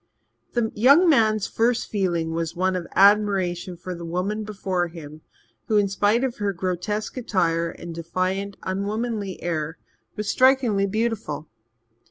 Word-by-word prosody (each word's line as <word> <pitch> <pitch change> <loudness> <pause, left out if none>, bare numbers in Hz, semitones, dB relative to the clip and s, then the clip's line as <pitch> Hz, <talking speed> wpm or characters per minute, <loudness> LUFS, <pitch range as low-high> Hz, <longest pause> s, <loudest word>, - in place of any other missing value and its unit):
The 235 -2 0
young 280 - +6
man's 215 - +3
first 235 +1 0
feeling 175 -5 0
was 165 0 -3
one 185 +1 +1
of 175 -2 -4
admiration 195 -3 +3
for 180 +1 -6
the 170 -1 -8
woman 185 +6 -2
before 190 -4 -2
him, 155 -2 -10 0.5
who, 215 - +2
in 205 -1 +3
spite 205 +5 +2
of 260 -3 -2
her 205 -1 -1
grotesque 185 +6 -3
attire 170 -8 0
and 170 0 -8
defiant, 185 +4 -2
unwomanly 205 +1 -3
air, 155 -2 -2 0.4
was 210 -1 -4
strikingly 255 -7 +3
beautiful. 210 -8 -2
195 Hz, 140 wpm, -24 LUFS, 175-215 Hz, 0.5 s, young